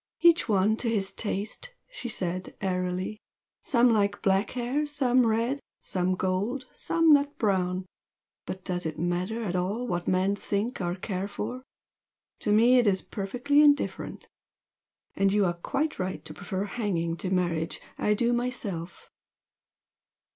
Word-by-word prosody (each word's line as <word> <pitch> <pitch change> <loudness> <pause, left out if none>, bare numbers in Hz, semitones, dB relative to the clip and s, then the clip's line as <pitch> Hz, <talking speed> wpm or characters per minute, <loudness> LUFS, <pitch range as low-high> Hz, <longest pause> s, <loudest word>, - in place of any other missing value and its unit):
"Each 340 -6 +5
one 210 +2 +3
to 235 - 0
his 200 -4 0
taste!" 220 - -3
she - - -6
said, 185 -3 -3
airily 185 +2 -2 0.4
"Some 240 -2 +4
like 205 -1 +1
black 195 +1 +2
hair 260 +5 0
some 255 -4 +3
red 230 +5 +1 0.2
some 185 0 0
gold 195 +9 -1
some 330 -2 +3
nut 285 0 +2
brown. 185 -3 0 0.6
But 185 0 -5
does 180 -2 -2
it 155 - -5
matter 180 +7 -1
at 185 -4 -2
all 195 +7 -1
what 175 -7 -2
men 190 +2 +2
think 205 +4 -2
or 175 0 -1
care 190 0 -3
for? 230 +5 -5 0.8
To - - 0
me 235 +4 +6
it 240 - +3
is 190 -2 +2
perfectly 245 +9 +1
indifferent! 290 -1 +2 0.9
And 195 0 +3
you 205 0 +3
are 175 - +1
quite 285 - -2
right 185 0 -3
to - - -7
prefer 195 -1 -3
hanging 190 -7 -1
to 185 - -3
marriage 170 -3 0 0.2
I 210 - +2
do, 240 +3 +2
myself!" 230 -9 -3
205 Hz, 145 wpm, -28 LUFS, 185-245 Hz, 0.9 s, me